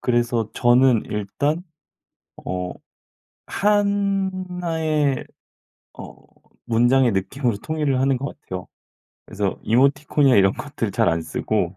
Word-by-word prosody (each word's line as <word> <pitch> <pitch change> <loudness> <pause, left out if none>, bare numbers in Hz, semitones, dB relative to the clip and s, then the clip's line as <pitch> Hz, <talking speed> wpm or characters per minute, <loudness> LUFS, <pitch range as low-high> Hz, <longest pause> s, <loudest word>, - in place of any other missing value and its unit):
그래서 120 -2 0
저는 120 -1 +4
일단 140 - -2 0.8
어. 90 0 -3 0.8
1 195 -4 0
의 150 -4 0 0.7
어. - - -9 0.5
문장의 120 +2 +3
느낌으로 105 +4 -1
통일을 150 +2 -1
하는 135 -1 +2
것 140 +3 -6
같아요. 90 -1 -7 0.6
그래서 100 -1 -3
이모티콘이나 140 +2 +3
이런 95 -1 +5
것들 - - -4
잘 - - +2
안 85 0 +1
쓰고 90 +3 -2
130 Hz, 220 characters per minute, -22 LUFS, 105-155 Hz, 0.8 s, 이런